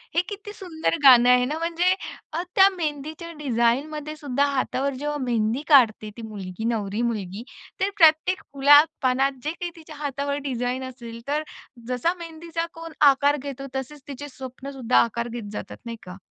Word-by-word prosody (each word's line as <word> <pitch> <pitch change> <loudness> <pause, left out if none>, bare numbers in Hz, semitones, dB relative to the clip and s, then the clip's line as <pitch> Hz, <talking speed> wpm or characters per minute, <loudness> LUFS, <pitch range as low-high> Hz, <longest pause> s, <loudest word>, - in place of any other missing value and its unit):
हे 345 - +5
किती 415 0 -7
सुंदर 335 -4 -2
गाणं 250 -2 +8
आहे 250 0 +6
ना. 300 +4 -2
म्हणजे 340 +2 +2 0.4
अ, 330 - -1
त्या 385 0 +8
मेहंदीच्या 315 +1 -4
डिझाईनमध्ये 285 +4 0
सुद्धा 285 -2 0
हातावर 275 +1 -1
जेव्हा 295 +2 -3
मेहंदी 235 +2 0
काढते 230 -7 +5
ती - - -7
मुलगी, 195 -1 -7
नवरी 215 -1 -1
मुलगी, 205 0 -5 0.4
तर 390 - +2
प्रत्येक 325 +1 +5
फुला-पानात 275 -2 +5
जे 305 - -1
काही 345 0 -5
तिच्या 315 -2 -12
हातावर 280 0 -2
डिझाईन 250 0 -2
असेल, 235 -2 -10
तर 300 +2 0 0.4
जसा 255 +7 0
मेहंदीचा 330 0 -5
कोन 330 0 -9 0.2
आकार 285 +2 +2
घेतो, 275 0 -6
तसेच 265 +2 -5
तिचे 290 +1 -7
स्वप्नंसुद्धा 260 -1 -3
आकार 235 +1 -3
घेत 225 -3 -6
जातात, - - -6
नाही 230 -1 -6
का? 180 +1 -9
275 Hz, 160 wpm, -24 LUFS, 240-310 Hz, 0.4 s, गाणं